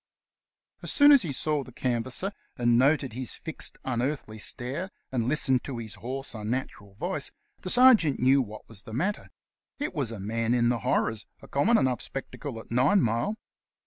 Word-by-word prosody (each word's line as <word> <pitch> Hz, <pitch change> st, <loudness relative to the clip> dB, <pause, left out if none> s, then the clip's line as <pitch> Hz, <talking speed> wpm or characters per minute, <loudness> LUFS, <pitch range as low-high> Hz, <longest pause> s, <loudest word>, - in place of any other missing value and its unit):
As -, -, -1 dB
soon 290 Hz, 0 st, +7 dB
as 280 Hz, -3 st, +8 dB
he 165 Hz, -, -2 dB
saw 150 Hz, +1 st, -1 dB
the 130 Hz, -, -13 dB
canvasser, 125 Hz, -, -1 dB, 0.3 s
and 120 Hz, -1 st, +3 dB
noted 135 Hz, 0 st, +3 dB
his 130 Hz, +1 st, -4 dB
fixed, 160 Hz, -, -4 dB
un 120 Hz, -2 st, -1 dB
earthly 125 Hz, -5 st, -3 dB
stare, 135 Hz, -, -3 dB, 0.2 s
and 120 Hz, -3 st, 0 dB
listened 130 Hz, -3 st, +3 dB
to 135 Hz, -4 st, -5 dB
his 110 Hz, -2 st, -6 dB
hoarse, 135 Hz, +3 st, -3 dB
unnatural 105 Hz, -3 st, -4 dB
voice, -, -, -2 dB, 0.3 s
the 185 Hz, -, -6 dB
sergeant 230 Hz, -, +6 dB
knew 135 Hz, +2 st, +5 dB
what 110 Hz, -3 st, -8 dB
was 110 Hz, -3 st, -5 dB
the 110 Hz, -, -11 dB
matter; 190 Hz, +10 st, -2 dB, 0.5 s
it 295 Hz, +2 st, -3 dB
was 140 Hz, -8 st, -1 dB
a 115 Hz, -3 st, -6 dB
man 115 Hz, +4 st, 0 dB
in 120 Hz, -1 st, +3 dB
the 120 Hz, -1 st, +1 dB
horrors, 110 Hz, +1 st, 0 dB, 0.2 s
a -, -, -11 dB
common 215 Hz, +12 st, +3 dB
enough 130 Hz, -, +1 dB
spectacle 135 Hz, -2 st, -6 dB
at 115 Hz, -, -13 dB
Nincmile. 125 Hz, -, +2 dB
130 Hz, 175 wpm, -27 LUFS, 115-150 Hz, 0.5 s, as